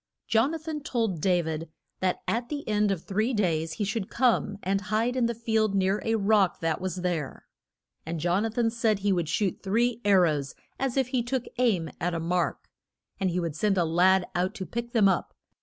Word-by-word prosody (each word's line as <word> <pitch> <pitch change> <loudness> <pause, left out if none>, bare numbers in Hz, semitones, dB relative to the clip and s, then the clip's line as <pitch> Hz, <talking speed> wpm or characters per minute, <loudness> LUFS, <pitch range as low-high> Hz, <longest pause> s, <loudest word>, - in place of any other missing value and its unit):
Jon 230 +8 +2
a - - -2
than 315 -1 -5
told 225 - -1
Da 180 -1 +2
vid 160 0 -4 0.3
that 185 -1 -1
at 235 +2 -1
the 290 -1 -5
end 210 -1 +2
of 190 -5 -1
the - - -29
three 220 +5 0
days 165 -5 0
he 205 - -3
should 200 0 -2
come 235 -5 +1
and 195 +1 0
hide 215 +5 0
in 245 -2 +2
the 235 - -2
field 220 -2 +1
near 195 +1 +1
a 225 0 +1
rock 200 -3 +2
that 165 +1 -1
was 185 -1 -2
there. 170 -6 -3 0.6
And 165 +1 -4
Jon 175 +5 +1
a 225 - 0
than 225 0 0
said 225 -2 +1
he 200 0 +1
would 170 -4 -1
shoot 200 -4 -1
three 235 +4 +1
ar 200 -2 +5
rows 150 -5 0 0.2
as 270 -1 -1
if 265 -2 +1
he 255 -2 +1
took 245 +1 -2
aim 205 -10 +1
at 175 0 -1
a - - -1
mark. 175 +2 -1 0.5
And 190 -1 +1
he 180 +1 -1
would 165 -4 -3
send 195 +3 +1
a 175 - +3
lad 180 +3 +4
out 185 +4 -1
to 190 - -5
pick 235 +3 -5
them 225 -5 +4
up. 190 -3 0
200 Hz, 225 wpm, -27 LUFS, 180-230 Hz, 0.6 s, ar